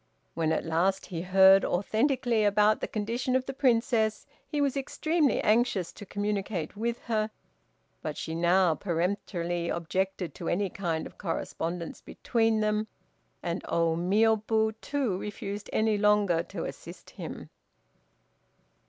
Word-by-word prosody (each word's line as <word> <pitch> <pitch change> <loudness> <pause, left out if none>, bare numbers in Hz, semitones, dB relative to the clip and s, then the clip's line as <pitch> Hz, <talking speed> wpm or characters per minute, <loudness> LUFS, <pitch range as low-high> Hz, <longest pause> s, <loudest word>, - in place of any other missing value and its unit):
When 160 -1 0
at - - 0
last 175 +4 +1
he 170 -3 -5
heard 190 +1 +6
authentically 230 +4 +1
about 210 +1 +3
the - - -1
condition 235 +4 -2
of 260 0 +1
the 270 - -4
Princess, 230 -4 +1 0.2
he 295 - -2
was 280 -2 +1
extremely 300 +2 +1
anxious 215 -5 +2
to 205 - -11
communicate 205 -5 -2
with 235 +3 -2
her, 215 -2 0 0.7
but - - -4
she 160 - -4
now 175 +1 +3
peremptorily 175 -1 -2
objected 185 +1 -2
to 170 - -5
any 195 +1 0
kind 170 -5 -2
of - - -12
correspondence 170 -1 -4
between 225 -2 0
them, 215 0 0 0.6
and 170 +2 -2
Ô 165 -1 +1
Miôbu 220 +4 +2
too 260 -10 -1
refused 205 0 -6
any 220 -1 +2
longer 205 -5 +3
to - - -6
assist - - -9
him. - - -8
205 Hz, 135 wpm, -28 LUFS, 175-225 Hz, 0.7 s, heard